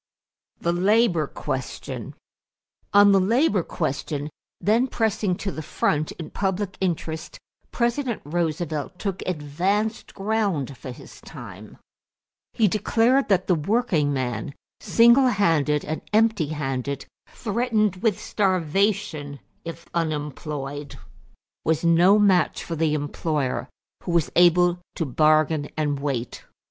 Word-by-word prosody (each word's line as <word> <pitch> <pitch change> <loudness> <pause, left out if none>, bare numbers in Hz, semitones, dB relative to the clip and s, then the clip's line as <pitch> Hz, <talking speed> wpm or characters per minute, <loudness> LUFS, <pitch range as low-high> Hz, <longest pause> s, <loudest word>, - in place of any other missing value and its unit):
=The 170 - 0
Labor 185 -3 +3
Question.= 135 -3 -5 0.8
On 205 0 +7
the 195 - +5
labor 210 - +2
question, 150 -2 -3 0.3
then 230 +5 +2
pressing 220 -6 0
to 195 +2 -4
the 155 - -6
front 150 0 0
in 160 -3 -9
public 195 0 -2
interest, 165 -3 -3 0.3
President 240 0 0
Roosevelt 160 0 -2
took 195 -2 -3
advanced 185 +7 -1
ground 195 - -1
for 130 - -9
his 125 - -11
time. - - -11 0.8
He 220 -3 +3
declared 230 +6 +2
that 190 -2 +3
the 185 - +3
working 170 -3 +1
man, 130 0 -3 0.2
single 235 +3 +5
handed 160 - +2
and 155 +1 -3
empty 220 -6 +3
handed, 140 -2 -3 0.2
threatened 215 -3 0
with 215 -1 0
starvation 185 -5 0 0.2
if 165 0 -8
unemployed, 150 -3 -4 0.7
was 160 +1 0
no 175 +5 +6
match 195 -4 +3
for 165 - -4
the 155 -1 +1
employer 145 -4 -2 0.3
who 175 - -4
was 170 -3 +2
able 175 0 +5 0.2
to 165 - -1
bargain 155 +2 +2
and 145 -2 0
wait. 135 -4 -3
170 Hz, 115 wpm, -24 LUFS, 150-205 Hz, 0.8 s, On